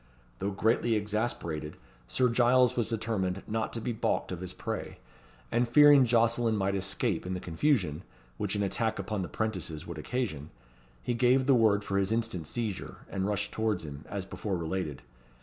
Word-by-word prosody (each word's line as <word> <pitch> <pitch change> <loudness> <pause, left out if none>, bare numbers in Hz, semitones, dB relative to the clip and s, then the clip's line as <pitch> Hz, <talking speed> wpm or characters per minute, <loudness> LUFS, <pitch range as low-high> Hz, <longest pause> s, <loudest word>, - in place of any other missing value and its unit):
Though 100 - -1
greatly 110 +3 +2
exasperated, 105 -8 -2 0.3
Sir 125 - +2
Giles 125 +1 +4
was 115 -3 0
determined 100 -5 -1
not 110 0 -2
to 115 - -2
be 120 +1 -2
baulked 110 - -1
of 90 -1 -5
his 90 -1 -4
prey; - - -5 0.5
and 120 +1 +1
fearing 145 +1 +8
Jocelyn 115 -1 +3
might 100 -1 0
escape 95 0 0
in 95 +1 -3
the - - -3
confusion, 90 - 0 0.4
which 105 0 -1
an 105 - 0
attack 110 +3 -1
upon 105 -3 -3
the 90 - -3
'prentices 90 -7 -3
would 85 -2 -7
occasion, 80 - -3 0.5
he - - 0
gave 125 +2 +3
the 140 - +5
word 110 -4 +4
for 100 -1 0
his 100 +1 0
instant 110 -8 -1
seizure, 110 -6 -4
and 95 0 -1
rushed 105 -1 -1
towards 110 -6 -1
him, 75 0 -8
as 100 -2 -4
before 95 0 -3
related. 80 -3 -3
105 Hz, 175 wpm, -30 LUFS, 95-115 Hz, 0.5 s, fearing